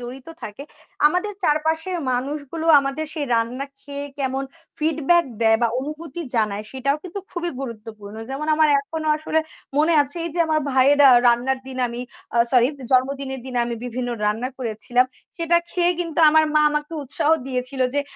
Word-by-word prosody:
জড়িত 250 +3 -8 0.2
থাকে, 210 +6 -7 0.4
আমাদের 360 +6 0
চারপাশের 320 +4 +1 0.2
মানুষগুলো 285 +5 -3
আমাদের 275 +3 -3
সেই 295 -3 -2
রান্না 235 +4 -1
খেয়ে 285 0 -5
কেমন 270 0 -1 0.3
ফিডব্যাক 320 +2 +2 0.2
দেয় 225 0 +4
বা 235 - +4
অনুভূতি 315 +4 -6
জানায় 210 -2 0
সেটাও 275 +2 0
কিন্তু 370 +2 -6
খুবই 345 -1 -3
গুরুত্বপূর্ণ। 215 -4 -8
যেমন 280 +3 -4
আমার 310 0 +4
এখনো 310 +2 -4
আসলে 315 +1 0 0.4
মনে 315 +3 +4
আছে 285 +3 -4
এইযে 340 +1 -5
আমার 310 -1 +1
ভাইয়ের 270 +2 +4
আ - - +8 0.2
রান্নার 250 +3 +2
দিনে 260 -1 -3
আমি 235 +1 -6 0.3
আ 235 - +2
সরি! 245 -1 +5 0.2
জন্মদিনের 265 0 0
দিনে 250 -2 -3
আমি 235 - -3
বিভিন্ন 245 0 -3 0.2
রান্না 225 +4 -1
করেছিলাম। 245 +2 0 0.3
সেটা 340 0 +2
খেয়ে 355 0 +3
কিন্তু 335 -2 -3
আমার 315 +1 +5
মা 305 - +5
আমাকে 300 +1 -3
উৎসাহ 280 +3 -1 0.2
দিয়েছিল 255 0 -3
যে 285 - +2
275 Hz, 160 wpm, -22 LUFS, 250-315 Hz, 0.4 s, আ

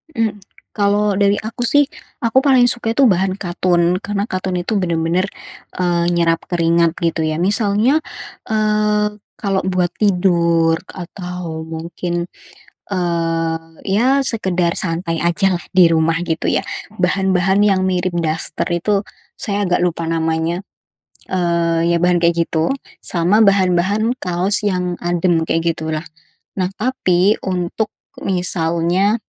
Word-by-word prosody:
Mmm. 220 -3 -1 0.4
Kalau 205 0 +2
dari 200 0 +3
aku, 230 +2 -3
sih, 290 +3 +3 0.3
aku 230 +1 +1
paling 265 -3 +5
suka 235 -2 -2
itu 265 0 +5
bahan 190 0 +1
katun, 175 -2 +1
karena 205 +2 -3
katun 185 0 -2
itu 210 +4 -1
benar-benar, 170 0 0 0.5
eee, 175 -1 0
nyerap 165 -1 +1
keringat, 170 -1 +2
gitu, 165 -1 0
ya. 155 +1 -1
Misalnya, 210 - +2 0.5
eee, 210 -1 +1 0.2
kalau 195 -2 -1
buat 185 -2 +1
tidur 170 -4 +2
atau 180 -3 -7
mungkin, 170 +2 -4 0.6
eee, 165 -3 -1 0.3
ya, 255 +8 +2
sekadar 180 -7 0
santai 165 -3 -2
ajalah 175 +1 +1
di 185 -2 +6
rumah, 165 0 +2
gitu, 160 -1 -1
ya, - - 0 0.3
bahan-bahan 190 +1 +2
yang 195 -2 +3
mirip 180 -1 0
daster 160 -1 -2
itu, 195 +4 0 0.3
saya 205 0 -2
agak 180 - +3
lupa 170 -1 -3
namanya, 165 +3 -1 0.6
eee, 170 -2 +1
ya, 170 - +3
bahan 175 0 +2
kayak 170 0 +2
gitu, 160 +5 0 0.3
sama 180 +6 +2
bahan-bahan 200 +3 +2
kaos 185 +3 0
yang 180 -3 0
adem, 175 -1 +1
kayak 165 0 0
gitulah. 155 0 -4 0.5
Nah, 185 - +1
tapi, 210 -5 +1
untuk 185 +3 -1 0.3
misalnya 175 +2 +1
180 Hz, 125 wpm, -18 LUFS, 170-200 Hz, 0.6 s, di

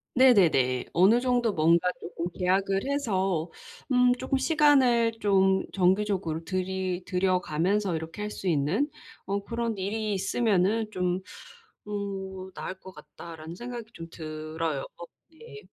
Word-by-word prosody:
네네네. 170 - +4
어느 200 +8 +4
정도 245 -3 +1
뭔가 170 +2 +3
쪼끔 170 -1 -5
'계약을 195 +1 +1
해서 195 - -1 0.4
음 250 0 +5
쪼끔 260 +1 -1
시간을 265 -7 +4
좀 190 -1 +3
정기적으로 185 -3 +1
들이 185 0 -2
들여가면서 185 +1 0
이렇게 160 +5 -6
할 210 - -3
수 195 - -6
있는 165 - +1 0.4
어 200 +1 -2
그런 230 -2 -2
일이 210 +2 -2
있으면은 205 +1 +1
좀 180 -1 -1 0.7
어 190 -2 -5
나을 185 - -6
것 190 - -11
같다.'라는 155 +2 -10
생각이 240 0 -7
좀 165 0 -9
들어요. 155 -2 -4 0.2
어 170 - -8 0.3
네. 425 +5 -13
190 Hz, 260 characters per minute, -27 LUFS, 170-225 Hz, 0.7 s, 음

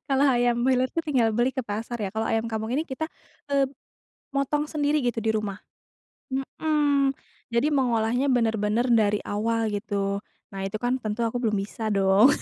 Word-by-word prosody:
Kalau 275 +1 +4
ayam 240 -2 +3
milot 255 -1 +2
itu - - -4
tinggal 245 -6 +3
beli 240 +4 +1
ke 260 - -1
pasar 225 +2 -4
ya. 195 - -2
Kalau 220 +2 -2
ayam 225 +1 0
kampung 220 +2 -2
ini 305 - +1
kita, 315 +1 -4 0.4
eee, 275 -1 +1 0.6
motong 295 +2 0
sendiri, 300 0 +1
gitu 240 -4 -1
di 220 - +1
rumah, 210 -2 -2 0.7
mhm. 285 +1 +1 0.4
Jadi 235 +6 +1
mengolahnya 245 0 +2
bener-bener 225 -2 +2
dari 210 -2 +4
awal, 225 +1 0
gitu. 200 -1 -1 0.3
Nah, 195 - -5
itu 205 - -4
kan 245 +3 -1
tentu 220 +1 -2
aku 240 +2 -1
belum 215 -4 +1
bisa 210 +3 -3
dong. 195 +3 +5
235 Hz, 170 wpm, -26 LUFS, 215-265 Hz, 0.7 s, dong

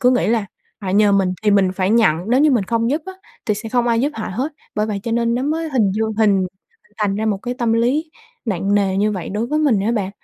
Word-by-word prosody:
cứ 250 - +4
nghĩ 250 - +2
là 220 -2 +1 0.4
họ 185 - -3
nhờ 205 +1 +4
mình 190 -2 +2
thì 210 - +3
mình 195 -2 +3
phải 190 +1 0
nhận, 220 -9 +4
nếu 260 +3 +4
như 305 - +5
mình 235 -7 +2
không 230 +4 0
giúp 300 +2 -1
á 380 - -6 0.3
thì 210 - +2
sẽ 220 +2 -6
không 245 0 +1
ai 230 -1 +2
giúp 285 +4 +1
họ 220 - -4
hết. 265 +10 -2 0.2
Bởi 210 +1 0
vậy 205 -2 -3
cho 230 - -3
nên 235 0 +1
nó 250 - -1
mới 320 +3 -1
hình 220 -8 +2
dương 220 +1 -1
hình 200 -4 +3 0.5
thành 205 -2 0
ra 220 - -1
một 205 -3 0
cái 245 +4 -4
tâm 235 -3 0
lý 265 +8 +1 0.3
nặng 200 -2 0
nề 195 -2 +1
như 210 +1 +1
vậy 185 -4 -5
đối 215 +4 -2
với 300 +4 0
mình 270 -10 +2
á 220 +4 0
bạn. 200 -4 -1
220 Hz, 275 wpm, -19 LUFS, 200-245 Hz, 0.5 s, như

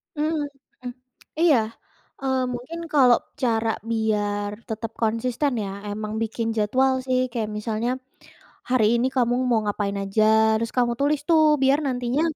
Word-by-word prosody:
Mmm, 305 +2 0 0.5
mhm, 250 -1 -6 0.5
iya, 325 -6 +5 0.6
eee, 265 -1 0 0.2
mungkin 260 +8 -6
kalau 255 -4 +6 0.2
cara 225 -2 +1 0.2
biar 205 -2 0 0.2
tetap 225 +1 -4
konsisten 235 +5 0
ya, 195 - -4 0.2
emang 215 +1 -4
bikin 225 +1 -3
jadwal 260 +6 +2
sih. 255 0 +2
Kayak 220 -3 -2
misalnya 220 +2 -2 0.8
hari 250 -4 +3
ini 250 +2 +1
kamu 245 -1 +2 0.2
mau 230 -2 +3
ngapain 200 -1 -2
aja 195 +2 +1 0.3
harus 230 0 -2
kamu 240 -1 +3
tulis 290 +1 +2
tuh, 320 -1 +5 0.2
biar 270 +2 +4
nantinya, 250 +3 -1
235 Hz, 140 wpm, -24 LUFS, 215-260 Hz, 0.8 s, kalau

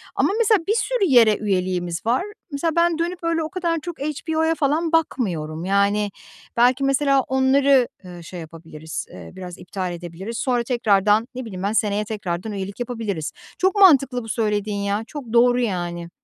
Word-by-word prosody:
Ama - - +2
mesela 435 -2 +4
bir 425 - +3
sürü 465 -2 +1
yere 235 - +6
üyeliğimiz 185 -3 -2
var. 245 +8 +2 0.3
Mesela, 305 +3 -1
ben 340 -1 +3
dönüp 345 +1 -2
öyle 330 -1 0
o 310 - -4
kadar 345 -3 -1
çok 345 +1 -7
HBO'ya 320 +2 -1
falan 310 +3 0
bakmıyorum. 175 - -1
Yani, 200 +1 +1 0.5
belki, 250 +3 +4
mesela 275 0 +3
onları, 265 0 +3 0.2
eee, 175 -2 -10
şey 175 +2 -8
yapabiliriz, 160 -1 -8
eee, 85 -3 -11
biraz 180 -1 -8
iptal 180 -1 -5
edebiliriz. 175 +6 -7
Sonra 245 -3 0
tekrardan, 215 -2 +2
ne 255 0 -5
bileyim 190 -4 -7
ben, 200 +2 0
seneye 210 -1 +1
tekrardan 200 -1 -4
üyelik 200 +1 -5
yapabiliriz. 225 -10 -3 0.3
Çok 375 +1 +2
mantıklı, 275 - +5
bu 225 - -9
söylediğin 210 -2 -1
ya, 200 +2 -1
çok 260 -6 -8
doğru, 245 +1 +5
yani. 175 -6 -2
230 Hz, 165 wpm, -22 LUFS, 190-280 Hz, 0.5 s, yere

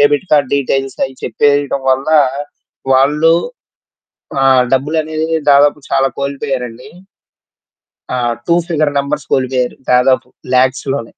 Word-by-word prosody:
Debit 145 +4 +2
card 145 -3 +2
details 135 0 -2
అయి 135 0 -7
చెప్పేయటం 145 +3 +1
వల్ల, 135 +3 0 0.8
వాళ్ళు. 150 +5 +3 1.1
ఆహ్, 130 -1 +4
డబ్బులునేది 155 +3 -1 0.2
దాదాపు 145 +1 +4
చాలా 135 - +2
కోల్పోయారండి. 135 -3 -4 1.3
ఆ! - - -2 0.3
2 170 - +3
ఫిగర్ 155 -4 0
నంబర్స్ 140 0 -3
కోలిపోయారు. 130 -1 -1
దాదాపు 125 0 +3 0.3
లాక్స్‌ 130 +2 +1
లోనే. 115 -5 -5
140 Hz, 105 wpm, -14 LUFS, 130-145 Hz, 1.3 s, ఆహ్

